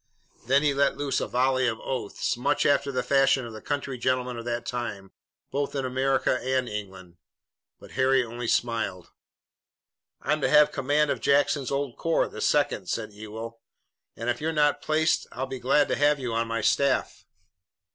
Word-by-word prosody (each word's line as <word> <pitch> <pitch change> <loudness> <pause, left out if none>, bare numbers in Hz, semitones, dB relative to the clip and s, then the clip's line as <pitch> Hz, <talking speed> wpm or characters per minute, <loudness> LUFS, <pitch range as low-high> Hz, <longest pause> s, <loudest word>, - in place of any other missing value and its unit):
Then 140 +3 +4
he 145 -2 +3
let 140 0 +1
loose 145 -1 -1
a - - -2
volley 130 0 +2
of 115 -2 -2
oaths, 130 -2 -3
much 125 +3 0
after 140 0 +2
the 130 -1 -1
fashion 135 0 +3
of 115 - -8
the 110 - -9
country 140 -3 -3
gentleman 125 0 0
of 115 0 -7
that 120 0 -3
time, 105 -6 -5 0.4
both 140 +1 -2
in 135 -1 -1
America 130 0 +1
and 130 -1 0
England. 95 -5 -7 0.6
But - - -14
Harry 130 0 +3
only 120 +1 -6
smiled. 110 -7 -1 1.1
"I'm 150 0 -1
to - - +1
have 150 0 +6
command 145 +2 +1
of - - -3
Jackson's 140 -1 +2
old 140 -3 -2
corps, 165 0 +1
the - - -8
second," 140 -10 +1
said 110 -2 -3
Ewell, 110 +2 -8 0.5
"and 115 - -6
if 120 - -1
you're 160 +1 0
not 150 -2 +2
placed 160 +1 +1
I'll 130 - -3
be 130 -1 -6
glad 140 +4 +3
to - - +1
have 145 +1 +3
you 125 -3 -3
on 115 0 0
my 115 0 -2
staff." 140 +5 +1
130 Hz, 180 wpm, -26 LUFS, 115-140 Hz, 1.1 s, have